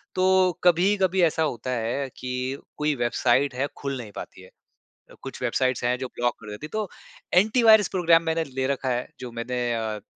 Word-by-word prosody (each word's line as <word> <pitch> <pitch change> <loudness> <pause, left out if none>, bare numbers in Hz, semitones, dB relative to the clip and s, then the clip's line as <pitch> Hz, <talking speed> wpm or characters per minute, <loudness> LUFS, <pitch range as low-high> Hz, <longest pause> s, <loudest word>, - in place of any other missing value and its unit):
तो 185 0 +4
कभी-कभी 185 +1 +3
ऐसा 160 -1 +2
होता 130 -4 -3
है 125 +3 -2
कि 125 +1 -3 0.2
कोई 150 0 0
वेबसाइट 130 +3 +2
है, 140 +3 0
खुल 140 -1 -4
नहीं 110 -4 -8
पाती - - -9
है। 95 - -15 0.7
कुछ - - -8
वेबसाइट्स 130 -1 0
हैं, 125 +1 +1
जो 130 - -3
ब्लॉक 120 0 0
कर 105 -1 -11
देती 105 +8 -7
हैं, - - -9
तो 215 -3 -2 0.5
एंटी 220 +5 +2
वायरस 220 -3 +7
प्रोग्राम 170 -2 +4
मैंने 165 0 0
ले 130 -2 -3
रखा 135 -1 -1
है, 125 0 -1
जो 125 -2 -7
मैंने 120 +1 -2
अ, 110 -2 -3
त - - -27
135 Hz, 195 wpm, -25 LUFS, 120-170 Hz, 0.7 s, वायरस